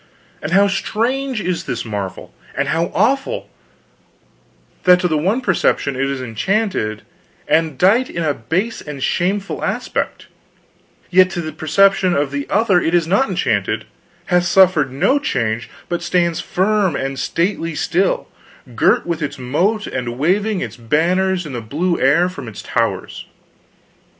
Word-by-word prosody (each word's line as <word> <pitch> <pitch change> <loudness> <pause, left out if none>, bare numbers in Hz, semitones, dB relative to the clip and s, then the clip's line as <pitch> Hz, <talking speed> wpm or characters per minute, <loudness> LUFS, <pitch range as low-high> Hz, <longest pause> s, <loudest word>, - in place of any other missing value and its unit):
"And 155 - -4
how 200 +2 +5
strange 245 +6 -1
is 180 -2 -2
this 120 - -3
marvel, 100 -4 -5 0.2
and - - -1
how 165 +1 +1
awful 275 - 0 1.3
that 180 0 +7
to 180 - +2
the 160 - 0
one 190 +12 +1
perception 180 - +1
it 135 +1 0
is 135 -2 -3
enchanted 120 - -1 0.4
and 160 -3 +1
dight 220 - +3
in 170 - -3
a 150 -2 +1
base 180 - -2
and 145 -3 -7
shameful 195 +3 -1
aspect; - - -2 0.9
yet 185 0 +6
to 175 -2 -3
the 155 -1 -5
perception 185 +4 +3
of 140 -1 0
the 140 0 -3
other 200 -4 +3
it 165 - +1
is 170 -2 +3
not 200 +10 +2
enchanted, - - -1 0.4
hath 180 -1 +2
suffered 175 -7 +4
no 255 - +2
change, 115 - -2 0.2
but 175 - -2
stands 170 -2 +1
firm 195 -3 +1
and 135 0 -3
stately 165 -2 -1
still, 185 +5 0 0.5
girt 195 - +3
with 170 -2 -3
its 145 - -3
moat 175 - 0
and 120 -2 -4
waving 195 +7 +1
its - - -5
banners 175 +9 +1
in 145 - -7
the 120 - -4
blue 165 +10 -1
air 145 +7 +4
from 140 -9 -8
its 110 - -8
towers. - - -2
175 Hz, 150 wpm, -19 LUFS, 140-195 Hz, 1.3 s, that